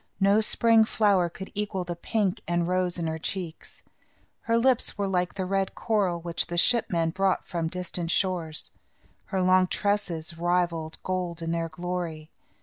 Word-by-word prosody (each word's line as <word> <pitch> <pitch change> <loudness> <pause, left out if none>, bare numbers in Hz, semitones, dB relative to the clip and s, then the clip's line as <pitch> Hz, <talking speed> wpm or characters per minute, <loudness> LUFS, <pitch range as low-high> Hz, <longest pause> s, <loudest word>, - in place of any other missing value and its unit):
No 200 +2 +4
spring 225 +1 +4
flower 200 -5 +2
could 190 +3 -9
equal 205 -2 -2
the 175 -1 -5
pink 195 +1 -1
and 175 0 +1
rose 180 -1 0
in 170 - -2
her 160 0 -2
cheeks. 170 -1 -5 0.6
Her 230 0 +1
lips 250 -1 +2
were 200 -1 0
like 180 -2 0
the 190 -2 -2
red 195 0 -1
coral, 200 -6 0
which 170 0 -2
the 175 0 -4
ship 235 +6 +4
men 165 -2 +1
brought 190 +1 0
from 170 -3 -2
distant 180 -1 -4
shores. 170 -5 0 0.5
Her 190 -2 -1
long 185 0 +5
tresses 180 -5 -1
rivalled 170 -2 0
gold 180 -2 -3
in 165 - -2
their 165 0 -1
glory. 170 -2 -5
180 Hz, 165 wpm, -27 LUFS, 170-195 Hz, 0.6 s, long